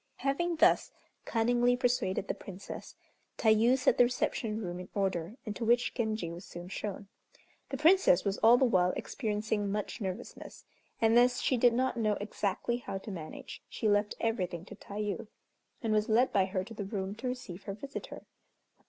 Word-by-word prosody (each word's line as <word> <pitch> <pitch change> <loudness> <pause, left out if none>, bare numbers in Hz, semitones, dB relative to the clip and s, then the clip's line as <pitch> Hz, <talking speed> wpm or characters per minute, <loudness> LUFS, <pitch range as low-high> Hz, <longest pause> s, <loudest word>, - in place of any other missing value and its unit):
Having 335 +6 0
thus 320 - +4 0.3
cunningly 245 +2 +2
persuaded 240 -6 0
the - - 0
Princess, 195 0 -9 0.4
Tayû 225 +3 +4
set 255 -2 +2
the - - +9
reception 235 -3 -1
room 180 -4 -4
in 180 - -8
order, 195 +1 -1
into 215 +2 -4
which 240 +2 +3
Genji 220 -7 -2
was 170 +2 -8
soon 175 0 -9
shown. 200 0 -5 0.6
The 270 - -3
Princess 325 - +5
was 200 0 -1
all 230 +2 +7
the 260 - +4
while 185 -6 +3
experiencing 210 -3 -2
much 210 +3 -3
nervousness, 190 -2 -6 0.3
and 225 +1 +5
as 245 0 +3
she 260 - +1
did 240 0 +4
not 255 +1 0
know 215 -2 +2
exactly 210 +3 -2
how 220 -5 -5
to 200 +2 -8
manage, 160 -4 -8
she 220 - -2
left 205 0 +2
everything 180 -7 -2
to 205 - -10
Tayû, 210 +2 -4 0.6
and 220 -1 +1
was 215 0 +1
led 235 +4 +3
by 195 -2 +4
her 185 -1 -2
to 225 - -10
the 210 - -5
room 195 -1 -3
to 230 +5 -5
receive 205 -7 -6
her 195 - -4
visitor. 275 +7 -8
215 Hz, 175 wpm, -31 LUFS, 195-245 Hz, 0.6 s, the